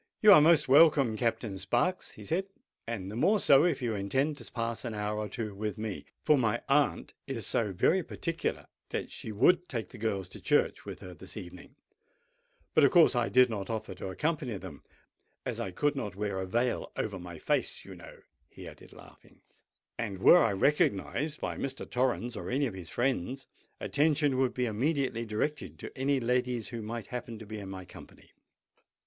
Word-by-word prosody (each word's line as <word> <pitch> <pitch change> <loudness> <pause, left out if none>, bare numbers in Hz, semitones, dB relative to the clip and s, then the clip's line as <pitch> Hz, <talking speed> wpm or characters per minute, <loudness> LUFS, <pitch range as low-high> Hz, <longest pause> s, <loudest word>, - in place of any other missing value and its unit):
"You 210 -1 +10
are 150 - +8
most 160 0 +5
welcome, 140 -4 +6
Captain 110 -3 -2
Sparks," 120 - 0
he - - -12
said; 185 +4 -1 0.4
"and 100 -5 -4
the - - -7
more 190 - +3
so 145 -3 +6
if 145 -7 0
you 115 -2 0
intend 130 +10 0
to - - -9
pass 115 -1 -3
an 115 -3 -4
hour 105 0 -2
or 105 -1 -3
two 110 -1 -4
with 105 +2 -4
me; 110 -2 -5 0.2
for 150 -2 +4
my 115 -1 +1
aunt 140 0 +1
is 120 -7 -3
so 105 -4 0
very 175 - +2
particular 165 0 -3 0.2
that - - -4
she 110 - -7
would 180 - +3
take 115 -4 -4
the 125 - -12
girls 100 -4 -2
to - - -11
church - - +1
with - - -8
her 90 - -9
this 95 +4 -10
evening; 90 +5 -10 1.0
but - - +5
of - - +7
course 170 -7 +6
I 120 -1 +1
did 125 0 +6
not 100 -5 -5
offer 110 -4 -4
to 95 - -7
accompany 135 - -2
them, 90 -7 -10 0.6
as - - -3
I - - -2
could 145 +11 0
not 105 -8 -4
wear 100 -1 -2
a 95 - -3
veil 120 +5 -1
over 100 -3 -3
my 85 -1 -9
face, - - -1
you - - -10
know," - - -13 0.3
he - - -11
added, - - -13
laughing; - - -17 0.6
"and 105 -5 -3
were 175 - +7
I 115 - +2
recognised 145 +6 +1
by - - -3
Mr. 135 -1 -4
Torrens 125 -1 -1
or - - -5
any 140 +3 +1
of 120 - -3
his 90 -4 -8
friends, 130 - -1 0.3
attention 145 -2 +1
would 130 -1 +1
be 125 - 0
immediately 120 0 -1
directed 135 +7 -3
to - - -9
any 135 +1 +1
ladies 125 -1 0
who 120 -2 -5
might 110 0 -5
happen 120 -2 -5
to 110 - -10
be 110 +1 -7
in 100 -1 -8
my 95 -1 -7
company. - - -15
120 Hz, 195 wpm, -30 LUFS, 105-140 Hz, 1.0 s, You